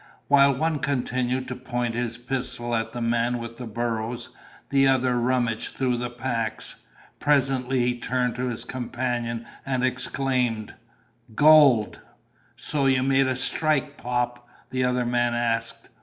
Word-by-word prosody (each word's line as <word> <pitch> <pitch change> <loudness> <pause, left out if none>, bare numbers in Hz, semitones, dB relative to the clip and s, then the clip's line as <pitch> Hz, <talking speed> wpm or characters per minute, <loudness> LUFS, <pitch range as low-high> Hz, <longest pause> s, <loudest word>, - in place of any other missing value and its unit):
While 140 -1 +6
one 155 +2 0
continued 130 -1 -1
to 125 - -4
point 120 -2 -3
his 120 0 -2
pistol 120 -1 -3
at 115 0 -1
the 120 - -5
man 120 +1 +1
with 115 0 -7
the 125 - -6
burros, 115 +1 -3 0.4
the 135 -1 +4
other 130 -1 +2
rummaged 120 -2 0
through 125 -2 0
the 120 0 -3
packs. 120 -2 -4 0.3
Presently 135 -3 +2
he 120 0 0
turned 125 0 0
to 125 +1 -1
his 120 -2 -4
companion 120 -2 -3 0.2
and 130 -1 0
exclaimed: 125 -3 -1 0.6
"Gold!" 145 -7 +6 0.6
"So 140 -2 -1
you 130 -1 +3
made 135 0 +3
a 130 - 0
strike, 145 +1 +1
Pop?" 120 0 -2 0.2
the 130 0 0
other 125 0 +1
man 120 0 +1
asked. 115 -1 -1
125 Hz, 140 wpm, -25 LUFS, 120-130 Hz, 0.6 s, While